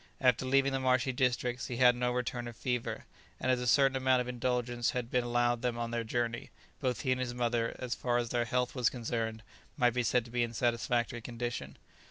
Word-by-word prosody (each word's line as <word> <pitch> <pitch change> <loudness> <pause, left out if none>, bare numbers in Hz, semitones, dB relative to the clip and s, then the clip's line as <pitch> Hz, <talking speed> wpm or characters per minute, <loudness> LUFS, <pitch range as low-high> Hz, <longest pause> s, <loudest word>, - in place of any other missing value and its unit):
After 125 -1 +3
leaving 135 +1 +3
the 135 - 0
marshy 130 0 +2
districts 125 0 0
he 120 - -4
had 125 -1 +6
no 125 0 0
return 125 -1 -2
of 120 - -8
fever, 125 0 -3 0.3
and 130 - +1
as 125 - +2
a 125 - -2
certain 135 +1 +4
amount 130 -1 +3
of 125 - -2
indulgence 120 -1 -1
had 120 -1 -4
been 125 -1 +2
allowed 120 0 +1
them 125 -2 -1
on 115 0 -3
their 120 0 -1
journey, 120 +1 -2 0.3
both 125 -3 -1
he 130 - 0
and 130 0 +1
his 120 -1 -3
mother, 120 -1 0
as 125 -1 -3
far 120 -2 0
as 120 -1 -1
their 120 -1 0
health 125 +1 0
was 125 -3 +2
concerned, 115 -2 -3 0.3
might 125 -4 +3
be 125 - +1
said 120 0 +1
to 120 - -12
be 120 0 0
in 120 - +1
a - - -12
satisfactory 120 +1 0
condition. 115 - -5
120 Hz, 230 wpm, -32 LUFS, 120-125 Hz, 0.3 s, had